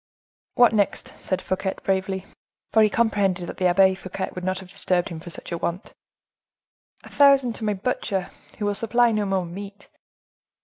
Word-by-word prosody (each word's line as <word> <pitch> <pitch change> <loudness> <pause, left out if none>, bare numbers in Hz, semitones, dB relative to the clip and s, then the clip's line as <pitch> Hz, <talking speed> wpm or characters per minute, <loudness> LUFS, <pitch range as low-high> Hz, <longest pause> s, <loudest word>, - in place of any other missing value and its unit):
"What 245 -2 +6
next?" 205 -3 0
said 185 -1 -3
Fouquet 190 +1 -2
bravely, 190 0 -1 0.5
for 220 - +6
he 215 - +5
comprehended 200 -5 +1
that - - -8
the 185 - +2
Abbe 190 +1 +5
Fouquet 190 0 -5
would 180 - -7
not 185 +1 -1
have 185 -1 -10
disturbed 180 -2 0
him 165 - -7
for 170 - -10
such 170 - -8
a 170 - -2
want. 175 +4 -4 1.1
"A - - -12
thousand 275 -4 +5
to - - -8
my 210 -1 0
butcher, 195 -3 -2 0.3
who 210 - -3
will 205 - +1
supply 235 +3 +2
no 210 -2 0
more 190 -2 0
meat." 200 +3 -9
195 Hz, 180 wpm, -24 LUFS, 185-215 Hz, 1.1 s, What